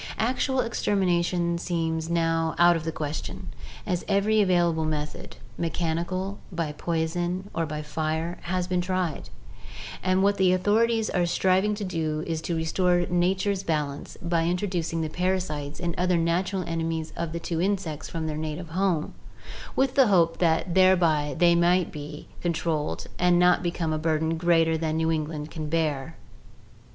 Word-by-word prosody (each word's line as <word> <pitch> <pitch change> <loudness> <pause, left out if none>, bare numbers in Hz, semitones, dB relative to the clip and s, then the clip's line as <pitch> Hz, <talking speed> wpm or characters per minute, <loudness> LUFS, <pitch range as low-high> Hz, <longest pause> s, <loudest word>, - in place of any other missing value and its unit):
Actual 255 +3 +1
extermina 190 -6 +1
tion 170 -1 -1
seems 165 -2 -2
now 165 -1 +1
out 175 0 +6
of 160 -1 -3
the 165 - -1
question, 150 -1 -5 0.4
as 180 -4 -1
every 210 +2 +3
available 175 -4 +2
method, 150 -1 -4 0.2
mechanical, 175 +4 -2
by 165 -4 -2
poison, 175 +4 -2
or 165 -1 -1
by 150 0 -4
fire, 160 +2 -2
has 180 +1 -1
been 180 0 0
tried, 180 -3 -2 0.7
and 185 +1 +2
what 200 0 +3
the 185 -1 +4
authorities 220 +4 +2
are 175 -2 +1
striving 190 +4 +2
to 205 - -5
do 160 -4 -2
is 160 -1 -2
to 170 - -2
restore 175 +2 +1
nature's 190 +2 +1
balance 150 -5 -3
by 170 -1 +1
in 175 +2 +1
troducing 170 -4 -2
the - - -1
parasites 155 -4 -2
and 175 -1 -2
other 180 -1 +2
natural 180 +3 0
enemies 165 -1 -3
of 170 -1 -3
the 170 - -3
two 165 0 -2
insects 180 -6 -2
from 165 -1 -3
their 155 -1 -2
native 155 +2 -4
home, 175 -2 0 0.6
with 265 -1 +2
the 270 -2 +5
hope 170 -5 +3
that 170 +1 +1
thereby 170 -6 +4
they 175 -1 +5
may 175 +2 +4
be 150 -1 -8
controlled 160 -3 -1
and 180 0 +4
not 180 0 +4
become 170 -2 -1
a 155 - -1
burden 160 0 0
greater 165 -1 +2
than 160 -1 -1
New 160 0 +1
England 155 -1 -3
can 155 -2 -5
bear. 160 -1 -1
170 Hz, 160 wpm, -26 LUFS, 160-185 Hz, 0.7 s, out